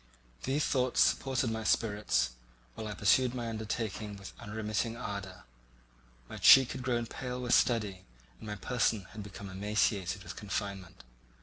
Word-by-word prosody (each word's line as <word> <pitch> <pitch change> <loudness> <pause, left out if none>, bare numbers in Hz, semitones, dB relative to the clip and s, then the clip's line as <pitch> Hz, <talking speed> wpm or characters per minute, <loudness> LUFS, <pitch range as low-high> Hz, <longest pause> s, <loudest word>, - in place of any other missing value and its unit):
These 140 +3 +1
thoughts 130 -2 +1
supported 130 -3 +2
my 110 0 -3
spirits, 105 - +1 0.4
while 110 - -6
I 105 - -5
pursued 125 +5 +3
my 120 -2 -3
undertaking 110 -1 -4
with 100 0 -10
unremitting 110 +1 -2
ardour. 100 -4 -6 0.8
My - - -8
cheek 135 -2 +8
had 130 - -5
grown 120 -2 0
pale 125 +1 -5
with 125 -1 0
study, 105 -6 +2 0.4
and - - -10
my 105 - -3
person 110 -1 0
had 110 - -7
become 100 0 -8
emaciated 100 -1 0
with - - -8
confinement. 100 -3 -5
110 Hz, 145 wpm, -31 LUFS, 100-120 Hz, 0.8 s, cheek